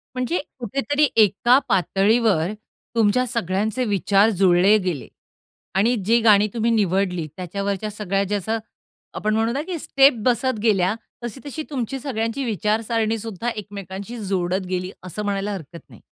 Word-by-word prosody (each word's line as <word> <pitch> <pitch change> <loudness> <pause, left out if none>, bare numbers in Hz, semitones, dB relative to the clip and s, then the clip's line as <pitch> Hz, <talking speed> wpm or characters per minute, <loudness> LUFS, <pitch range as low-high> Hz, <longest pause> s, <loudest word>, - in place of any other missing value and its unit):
म्हणजे 255 +7 -1 0.2
कुठेतरी 275 +5 +1
एका 220 +4 +5
पातळीवर 195 -1 +2 0.4
तुमच्या 230 +2 +3
सगळ्यांचे 215 +2 -1
विचार 200 0 +3
जुळले 190 +3 +5
गेले. 180 -9 -3 0.7
आणि 215 +6 +3
जी 230 +2 +4
गाणी 210 -2 +5
तुम्ही 230 0 +1
निवडली 190 -5 +1
त्याच्यावरच्या 200 +3 -3
सगळ्या 200 -1 -1
जसं 210 +2 -1 0.6
आपण 215 0 -1
म्हणू 230 +5 0
की 365 -2 -3
स्टेप 275 0 +5
बसत 250 -1 +1
गेल्या. 200 -3 +2 0.3
तशी-तशी 275 +6 -6
तुमची 270 -2 -3
सगळ्यांची 235 -1 -2
विचारसारणीसुद्धा 225 +1 -1
एकमेकांशी 200 +1 -7
जोडत 185 0 -1
गेली. 185 0 -2
असं 185 +3 -5
म्हणायला 200 0 -2
हरकत 170 -2 -8
नाही. - - -16
210 Hz, 125 wpm, -22 LUFS, 195-235 Hz, 0.7 s, एका